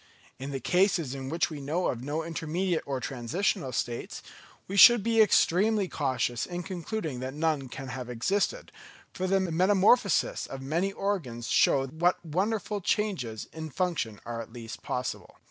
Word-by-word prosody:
In 135 Hz, +2 st, -5 dB
the 135 Hz, -1 st, -3 dB
cases 175 Hz, -, +2 dB
in 135 Hz, -1 st, -5 dB
which 165 Hz, +2 st, 0 dB
we 150 Hz, -2 st, -6 dB
know 160 Hz, +6 st, -1 dB
of 120 Hz, 0 st, -4 dB
no 150 Hz, +4 st, -2 dB
intermediate 165 Hz, +2 st, -1 dB
or 135 Hz, -2 st, -2 dB
transitional 135 Hz, -, -2 dB
states, 120 Hz, -1 st, -4 dB, 0.4 s
we 195 Hz, -, -4 dB
should 240 Hz, +2 st, +9 dB
be 225 Hz, 0 st, +4 dB
extremely 205 Hz, 0 st, +3 dB
cautious 125 Hz, -6 st, -1 dB
in 175 Hz, 0 st, -5 dB
concluding 170 Hz, -, -4 dB
that 130 Hz, +2 st, -5 dB
none 150 Hz, -4 st, 0 dB
can 135 Hz, +1 st, -7 dB
have 125 Hz, -1 st, -6 dB
existed, 195 Hz, -, -1 dB, 0.4 s
for 185 Hz, -, -2 dB
the 195 Hz, +1 st, +3 dB
metamorphoses 190 Hz, +4 st, +3 dB
of 135 Hz, -, -7 dB
many 165 Hz, +9 st, -1 dB
organs 160 Hz, -, -3 dB
show 135 Hz, -1 st, +4 dB
what 170 Hz, +6 st, 0 dB
wonderful 200 Hz, +5 st, -1 dB
changes 170 Hz, -, -1 dB
in 160 Hz, -1 st, -6 dB
function 155 Hz, -, -2 dB
are 115 Hz, -1 st, -4 dB
at 115 Hz, -, -10 dB
least 115 Hz, -1 st, -8 dB
possible. 125 Hz, -, -4 dB
160 Hz, 160 wpm, -28 LUFS, 130-190 Hz, 0.4 s, should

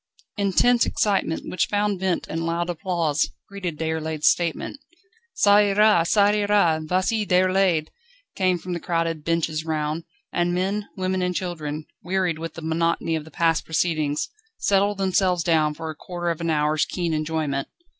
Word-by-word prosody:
Intense 210 Hz, +5 st, +3 dB
excitement, 195 Hz, -6 st, 0 dB
which 185 Hz, -, 0 dB
found 205 Hz, -2 st, 0 dB
vent 185 Hz, -2 st, -1 dB
in 165 Hz, +1 st, -3 dB
loud 170 Hz, +1 st, -1 dB
applause, 165 Hz, -3 st, 0 dB, 0.2 s
greeted 185 Hz, -5 st, -5 dB
Déroulède's 160 Hz, -1 st, -1 dB
statement. 175 Hz, -, 0 dB, 0.6 s
"Ça 205 Hz, 0 st, +5 dB
ira! 205 Hz, -3 st, +4 dB
ça 205 Hz, +1 st, +4 dB
ira! 205 Hz, -6 st, +2 dB
vas 185 Hz, +6 st, 0 dB
y 220 Hz, -2 st, 0 dB
Déroulède!" 185 Hz, -4 st, +2 dB, 0.5 s
came 185 Hz, -2 st, +2 dB
from 180 Hz, +1 st, -6 dB
the 170 Hz, -, -3 dB
crowded 165 Hz, -3 st, -1 dB
benches 165 Hz, -2 st, 0 dB
round; 155 Hz, 0 st, -2 dB, 0.3 s
and 175 Hz, 0 st, +1 dB
men, 195 Hz, +3 st, -1 dB
women, 185 Hz, 0 st, -1 dB
and 180 Hz, 0 st, -1 dB
children, 155 Hz, -4 st, -4 dB, 0.2 s
wearied 180 Hz, -2 st, -1 dB
with 165 Hz, -1 st, -6 dB
the 165 Hz, -, -8 dB
monotony 165 Hz, 0 st, 0 dB
of 155 Hz, -1 st, -4 dB
the -, -, -12 dB
past 165 Hz, 0 st, +1 dB
proceedings, 155 Hz, -2 st, 0 dB, 0.3 s
settled 200 Hz, +1 st, +2 dB
themselves 185 Hz, -2 st, +1 dB
down 155 Hz, -3 st, +2 dB
for 160 Hz, 0 st, -5 dB
a -, -, -10 dB
quarter 175 Hz, +2 st, -4 dB
of 165 Hz, -, -5 dB
an 170 Hz, -, -1 dB
hour's 155 Hz, 0 st, +2 dB
keen 175 Hz, -3 st, -2 dB
enjoyment. 155 Hz, -3 st, -1 dB
170 Hz, 160 wpm, -24 LUFS, 160-190 Hz, 0.6 s, Ça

